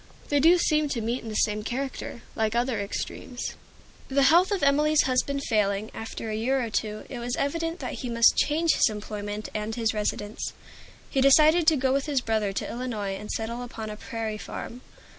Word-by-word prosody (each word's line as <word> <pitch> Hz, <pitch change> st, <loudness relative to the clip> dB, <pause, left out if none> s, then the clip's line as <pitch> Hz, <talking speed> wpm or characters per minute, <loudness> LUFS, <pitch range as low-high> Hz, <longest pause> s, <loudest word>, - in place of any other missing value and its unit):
They 290 Hz, -, +3 dB
do 330 Hz, +5 st, +6 dB
seem 305 Hz, -3 st, +2 dB
to 255 Hz, -, -1 dB
meet 230 Hz, +3 st, -2 dB
in 225 Hz, -, -7 dB
the 215 Hz, -, -5 dB
same 210 Hz, 0 st, +1 dB
character, 255 Hz, 0 st, -4 dB
like 220 Hz, 0 st, 0 dB
other 240 Hz, -2 st, +1 dB
extremes. 245 Hz, +4 st, -5 dB, 0.5 s
The 275 Hz, +1 st, +2 dB
health 340 Hz, +7 st, +6 dB
of 400 Hz, -6 st, -1 dB
Emilie's 300 Hz, +2 st, +4 dB
husband 275 Hz, +2 st, 0 dB
failing, 210 Hz, -2 st, 0 dB
after 225 Hz, 0 st, -6 dB
a -, -, -2 dB
year 255 Hz, +5 st, +1 dB
or 235 Hz, -3 st, -3 dB
two, 215 Hz, 0 st, -2 dB
it 250 Hz, -, -6 dB
was 240 Hz, +1 st, -2 dB
evident 330 Hz, +4 st, -1 dB
that -, -, -4 dB
he 250 Hz, -, -4 dB
must 230 Hz, -1 st, +5 dB
change 320 Hz, +2 st, +2 dB
his -, -, +4 dB
employment 210 Hz, 0 st, -5 dB
and 215 Hz, +1 st, -3 dB
his 225 Hz, -2 st, 0 dB
residence. 210 Hz, 0 st, -3 dB, 0.6 s
He 270 Hz, -, +2 dB
decided 310 Hz, +4 st, +6 dB
to 320 Hz, -, +7 dB
go 260 Hz, 0 st, +1 dB
with 275 Hz, +2 st, 0 dB
his 280 Hz, -4 st, +1 dB
brother 220 Hz, -3 st, 0 dB
to 195 Hz, -, -3 dB
Illinois 230 Hz, -5 st, -3 dB
and 210 Hz, +2 st, -7 dB
settle 230 Hz, +2 st, -3 dB
upon 225 Hz, -3 st, -6 dB
a -, -, -6 dB
prairie 220 Hz, -1 st, -5 dB
farm. 245 Hz, +3 st, -7 dB
240 Hz, 200 wpm, -26 LUFS, 215-280 Hz, 0.6 s, to